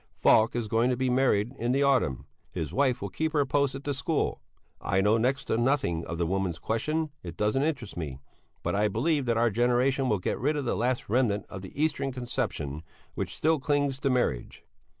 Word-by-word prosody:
Falk 110 +2 +4
is 120 -2 -1
going 115 +3 +2
to 125 - 0
be 130 0 0
married 125 -3 +2
in 120 +2 0
the 140 +1 +2
autumn. 130 - +2 0.2
His 80 -3 -5
wife 130 -6 +1
will 100 - -3
keep 160 +9 -2
her 145 -2 +3
post 140 -1 +1
at 135 - -7
the 145 - -1
school. 140 +3 -1 0.4
I 95 - +1
know 105 +3 +3
next 130 +4 0
to 110 - 0
nothing 120 - +1
of 85 - -4
the 85 - 0
Woman's 95 -1 -1
Question 150 - -1
it 85 -2 -8
doesn't 105 +6 +1
interest 140 -8 -2
me 75 -6 -5 0.5
but - - -1
I 105 +1 +2
believe 140 +5 0
that 115 -1 +2
our 115 0 +3
generation 125 +4 +2
will 105 - +2
get 90 - -2
rid 150 +5 +1
of 145 - -2
the - - 0
last 120 +2 -1
remnant 110 -3 +1
of 95 - -7
the 95 +8 -10
Eastern 145 -3 0
conception 120 - -3 0.3
which - - -4
still 160 0 +2
clings 145 -1 0
to 140 - 0
marriage. 120 - -1
125 Hz, 210 wpm, -28 LUFS, 105-140 Hz, 0.5 s, Falk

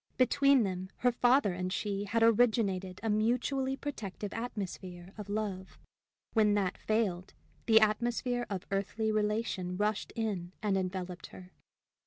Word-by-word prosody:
Between 275 0 +4
them 185 -1 -3 0.2
her 245 - +6
father 245 -4 +3
and 180 +1 -3
she 200 0 -2
had 225 +3 +1
originated 210 -5 +2
a 225 - 0
mutually 250 +5 +1
protective 210 -8 -5
atmosphere 190 -5 -6
of 210 -2 -8
love; 200 -3 -3 0.6
when 210 -2 +4
that 195 -3 0
failed, 200 -5 -1 0.3
the 220 -1 +7
atmosphere 240 +3 +1
of 195 -3 -4
earthly 200 +3 -1
relation 210 -4 -1
rushed 210 0 -1
in 195 -6 -2
and 205 -2 0
enveloped 185 -1 -3
her. 185 0 -13
210 Hz, 135 wpm, -31 LUFS, 190-230 Hz, 0.6 s, the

